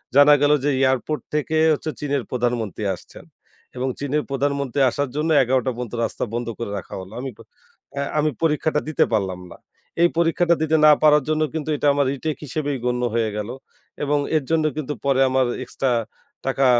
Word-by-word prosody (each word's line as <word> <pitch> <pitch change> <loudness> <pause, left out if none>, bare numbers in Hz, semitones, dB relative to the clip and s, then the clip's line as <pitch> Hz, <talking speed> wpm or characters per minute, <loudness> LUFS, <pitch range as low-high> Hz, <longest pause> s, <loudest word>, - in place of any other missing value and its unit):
জানা 145 +1 +8
গেল 145 - +4
যে, 145 - +2
এয়ারপোর্ট 130 +3 +1
থেকে 150 +1 -1 0.2
হচ্ছে 155 +1 -3
চীনের 140 -3 -1
প্রধানমন্ত্রী 120 -4 -2
আসছেন। - - -14 0.5
এবং 130 +1 -1
চীনের 145 +1 -1
প্রধানমন্ত্রী 140 -1 -1
আসার 140 +2 -2
জন্য 155 +2 0
১১টা 130 +1 +1
পর্যন্ত 120 -1 -6
রাস্তা - - -2
বন্ধ 120 0 -2
করে 115 -3 -4
রাখা 95 - -8
হলো। 95 +1 -11
আমি 135 - -4 0.7
অ্যা 140 +2 -2 0.2
পরীক্ষাটা 150 -1 +1
দিতে 155 - +3
পারলাম 95 -4 0
না। - - -11 0.4
এই 175 - +6
পরীক্ষাটা 170 +1 +3
দিতে 160 0 +2
না 150 - +9
পারার 150 -1 +6
জন্য 155 0 +1
কিন্তু 155 -1 -4
এটা 145 - 0
আমার 140 0 +2
রিটেক 150 +2 -3
হিসেবেই 145 0 -2
গণ্য 125 0 0
হয়ে 115 -2 +1
গেলো। 105 +2 -4 0.5
এবং 145 0 +1 0.2
এর 150 - -1
জন্য 160 -1 +2
কিন্তু 150 -1 -3
পরে 135 -1 +2
আমার 130 0 +2 0.2
এক্সট্রা 135 -2 -2 0.5
টাকা 135 0 +1
140 Hz, 175 wpm, -22 LUFS, 125-150 Hz, 0.7 s, না